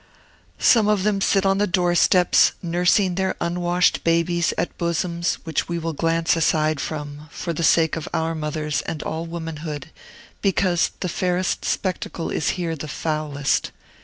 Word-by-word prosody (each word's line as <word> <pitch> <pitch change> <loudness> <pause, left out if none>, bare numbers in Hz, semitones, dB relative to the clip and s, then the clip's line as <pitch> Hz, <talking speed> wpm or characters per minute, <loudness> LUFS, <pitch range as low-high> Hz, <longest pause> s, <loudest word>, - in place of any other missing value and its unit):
Some 225 -4 +4
of 210 -3 +2
them 205 -1 +1
sit 195 0 +2
on 195 0 +2
the 205 - +2
doorsteps, 175 0 +4
nursing 180 +2 +2
their 190 +1 -1
unwashed 175 +1 +1
babies 170 0 +2
at 175 - -2
bosoms 170 0 -1
which 160 -1 -2
we 170 - -1
will 165 -1 -3
glance 165 +2 +1
aside 155 -2 +1
from, 150 0 -6
for 170 - -4
the 165 - -4
sake 160 -1 +3
of 160 - -5
our 160 0 -1
mothers 150 -1 -2
and 155 - -4
all 160 +1 -4
womanhood, 160 -3 -6 0.5
because 185 -3 +2
the 180 - -1
fairest 180 +1 -1
spectacle 185 -3 -2
is 150 - 0
here 170 -2 -2
the 155 0 -7
foulest. 150 -2 -1
170 Hz, 155 wpm, -22 LUFS, 160-180 Hz, 0.5 s, Some